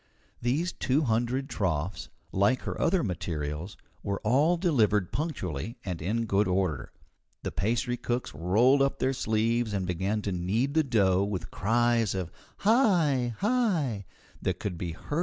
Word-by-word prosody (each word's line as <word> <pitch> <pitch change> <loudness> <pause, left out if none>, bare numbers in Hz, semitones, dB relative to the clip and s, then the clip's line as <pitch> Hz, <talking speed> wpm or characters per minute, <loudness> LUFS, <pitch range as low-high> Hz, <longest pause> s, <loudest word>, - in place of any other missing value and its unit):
These 145 +9 0
two 135 +3 +1
hundred 120 +2 0
troughs, 90 - -2 0.2
like 100 +7 +2
her - - -4
other 170 +4 +2
materials, 85 -2 -4 0.2
were 100 0 -2
all 140 +10 +3
delivered 110 - +2
punctually 115 - -3
and 90 -4 -4
in 115 +7 0
good 100 -1 +2
order. 90 -9 -1 0.5
The - - -3
pastry 120 - 0
cooks 120 -5 -3
rolled 110 - +3
up 140 0 +2
their 135 - +1
sleeves 115 -1 0
and 95 -2 -1
began 95 +4 -1
to 100 - -2
knead 100 +10 0
the 160 0 +3
dough 100 -8 +3
with 95 -4 -4
cries 115 0 +2
of 90 -3 -3 0.3
"Hi! 170 - +3
110 Hz, 130 wpm, -28 LUFS, 95-130 Hz, 0.5 s, all